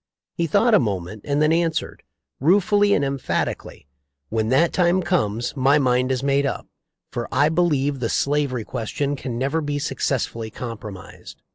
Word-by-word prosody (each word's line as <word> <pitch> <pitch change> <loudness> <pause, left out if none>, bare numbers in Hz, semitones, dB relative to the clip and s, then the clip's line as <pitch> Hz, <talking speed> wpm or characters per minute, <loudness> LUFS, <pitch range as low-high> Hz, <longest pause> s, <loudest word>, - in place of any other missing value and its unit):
He 170 - -1
thought 220 +8 +3
a - - +7
moment 100 -2 -3
and 145 +1 +1
then 155 +1 +3
answered, 165 -1 -1 0.4
ruefully 200 +6 +3
and 140 - +1
emphatically, 135 - -3 0.4
'When 110 0 -1
that 140 +7 +3
time 180 +1 +2
comes 120 - -1
my 135 +2 +4
mind 125 -2 +2
is 130 0 -1
made 140 0 +2
up, - - -4 0.5
for 120 - -4
I 145 +3 +3
believe 145 -5 +1
the 115 -2 -1
slavery 140 -4 0
question 130 +5 -3
can 125 -3 -5
never 140 +6 0
be 145 -1 -2
successfully 125 -6 -2
compromised.' 110 -4 -9
140 Hz, 155 wpm, -22 LUFS, 120-160 Hz, 0.5 s, a